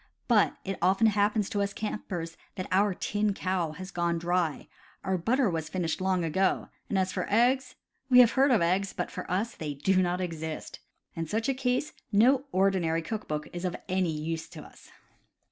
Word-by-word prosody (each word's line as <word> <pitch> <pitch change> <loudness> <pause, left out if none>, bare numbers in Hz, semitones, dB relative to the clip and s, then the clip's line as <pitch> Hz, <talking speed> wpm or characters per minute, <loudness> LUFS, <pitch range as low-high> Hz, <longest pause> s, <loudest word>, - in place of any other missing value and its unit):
But 225 -4 +3
it 195 0 -3
often 190 +5 +3
happens 210 -1 +2
to 205 - 0
us 200 0 -1
campers 180 -6 -4 0.2
that 185 -2 -4
our 195 +1 +3
"tin 205 +1 -1
cow'" 180 -5 -1
has 185 +4 -8
gone 170 -1 0
dry, 170 -2 -1 0.4
our 190 - 0
butter 235 +8 +2
was 160 -4 -2
finished 170 -1 -2
long 185 -2 +1
ago, 190 +5 +1 0.2
and 200 - 0
as 185 -1 0
for 180 - -2
eggs 255 +4 +2 0.2
— 265 - -47
we 250 - +6
have 245 -2 +8
heard 275 +2 +4
of 230 -9 +4
eggs, 190 +3 +1
but - - -3
for 180 - -7
us 205 +6 -1
they 150 -2 -5
do 185 +7 +2
not 180 0 0
exist. 160 -3 -5 0.4
In 165 -1 -3
such 225 - 0
case, 255 +2 -1 0.2
no 250 +6 +4
ordinary 185 -4 +2
cook 215 +4 -5
book 150 -1 -3
is 175 0 -5
of 180 -2 -1
any 185 -1 +1
use 160 +1 -4
to - - -10
us. - - -16
190 Hz, 195 wpm, -28 LUFS, 170-215 Hz, 0.4 s, have